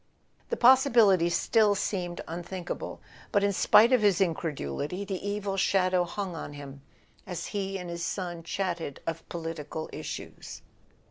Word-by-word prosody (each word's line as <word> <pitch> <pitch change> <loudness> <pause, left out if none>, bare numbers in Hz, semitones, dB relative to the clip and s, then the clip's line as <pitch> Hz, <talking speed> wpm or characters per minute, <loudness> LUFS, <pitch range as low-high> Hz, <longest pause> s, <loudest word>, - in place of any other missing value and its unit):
The 475 - -1
pos¬ 260 +2 +8
sibility 195 -7 +5
still 210 +3 +3
seemed 180 -3 -2
unthinkable; 175 +2 -5 0.3
but 200 - +3
in 200 0 +2
spite 230 +5 +6
of 250 - +5
his 205 -2 +4
incredulity 160 - -2
the 195 -2 -4
evil 205 -1 -2
shadow 185 -2 +2
hung 185 0 -4
on 145 - -6
him 140 -1 -9 0.5
as 180 -3 -4
he 195 -1 -2
and 180 -1 -7
his 170 0 -5
son 175 -2 -3
chatted 170 -4 -3
of 165 0 -5
political 160 -2 -5
issues. - - -7
180 Hz, 145 wpm, -28 LUFS, 165-200 Hz, 0.5 s, pos¬